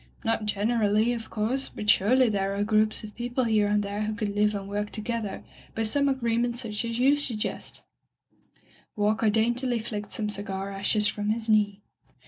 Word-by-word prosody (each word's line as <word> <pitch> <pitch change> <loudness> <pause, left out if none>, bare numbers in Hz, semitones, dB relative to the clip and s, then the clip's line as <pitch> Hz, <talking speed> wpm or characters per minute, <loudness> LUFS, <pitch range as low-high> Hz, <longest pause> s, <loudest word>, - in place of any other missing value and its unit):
"Not 225 -1 0
generally, 215 +2 +2
of 230 -2 -6
course, 235 +6 -1
but 210 - -7
surely 245 +6 +5
there 195 -2 0
are 200 - 0
groups 215 +1 +2
of 210 -1 -9
people 245 +2 -2
here 215 -3 +2
and 205 0 +2
there 200 +1 -3
who 215 0 -2
could 210 -2 -2
live 210 +1 +2
and 195 -1 -5
work 205 +1 -2
together 215 -2 -4 0.3
by 225 - 0
some 280 +6 +3
agreement 240 -2 0
such 225 -3 -2
as 230 0 -3
you 265 +3 +5
suggest/' 255 -7 -3 1.1
Walker 215 +1 +2
daintily 240 +3 +1
flicked 210 -2 -5
some 215 - -2
cigar 195 -1 -3
ashes 205 +2 0
from 210 0 -1
his 225 +1 -1
knee. 205 -2 +2
215 Hz, 175 wpm, -27 LUFS, 205-235 Hz, 1.1 s, surely